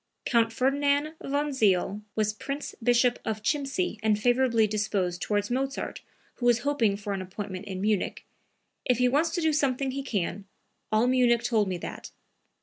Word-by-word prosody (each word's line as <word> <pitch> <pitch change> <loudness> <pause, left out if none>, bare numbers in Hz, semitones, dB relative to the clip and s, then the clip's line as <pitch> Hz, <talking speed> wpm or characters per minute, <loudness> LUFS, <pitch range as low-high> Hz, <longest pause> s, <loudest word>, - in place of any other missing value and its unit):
Count 230 -2 +3
Ferdinand 285 +5 +1
von 290 +1 -1
Zeil 205 -4 +2
was 215 -1 +1
Prince 275 +6 -5
Bishop 245 +1 +3
of 215 -1 -3
Chimsee 290 - -1
and 215 -1 +2
favorably 245 -1 +3
disposed 200 -4 -1
towards 205 +1 -1
Mozart, 270 +2 -2 0.4
who 245 - 0
was 240 0 +4
hoping 240 -8 +1
for 205 0 -4
an 195 - -3
appointment 185 0 -6
in 190 -2 -5
Munich. 210 -1 -1 0.6
"If 250 -2 +2
he 250 0 +3
wants 295 +6 +2
to 350 - 0
do 320 -1 +2
something 275 -2 +1
he 275 +1 -3
can; 205 -5 -3 0.5
all 215 +2 +3
Munich 245 -2 +3
told 225 -4 +2
me 185 -1 -2
that." - - -7
240 Hz, 165 wpm, -27 LUFS, 210-275 Hz, 0.6 s, was